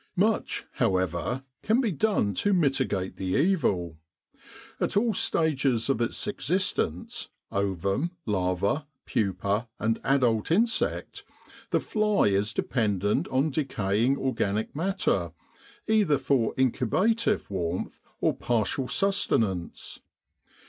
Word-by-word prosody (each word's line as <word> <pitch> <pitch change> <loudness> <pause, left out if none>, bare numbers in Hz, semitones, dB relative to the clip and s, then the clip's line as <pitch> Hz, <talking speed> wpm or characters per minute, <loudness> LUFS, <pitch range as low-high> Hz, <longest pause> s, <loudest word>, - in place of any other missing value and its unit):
Much, - - +1
however, 95 +7 0 0.2
can 220 +3 +2
be 235 -6 +1
done 170 - +1
to 200 - +1
mitigate 135 - 0
the 95 -1 -1
evil. 95 - +1 0.8
At - - 0
all 225 +1 +2
stages 135 - +2
of 120 - -1
its 120 - -1
existence 185 - -1 0.2
ovum, 100 - -1 0.2
larva, 100 - 0 0.2
pupa 100 +2 -1
and 110 +2 0
adult 125 -6 +2
insect 220 +6 0 0.5
the - - +2
fly 210 - +2
is 100 +2 +1
dependent 105 -4 0
on 135 +4 +1
decaying 125 -3 0
organic 110 -5 -1
matter 145 - 0 0.5
either 210 -9 +3
for 130 -6 +1
incubative 185 - +1
warmth 90 -2 -3 0.2
or - - +2
partial 120 +3 0
susten 155 - +2
ance. 90 -3 -6
120 Hz, 105 wpm, -27 LUFS, 100-165 Hz, 0.8 s, either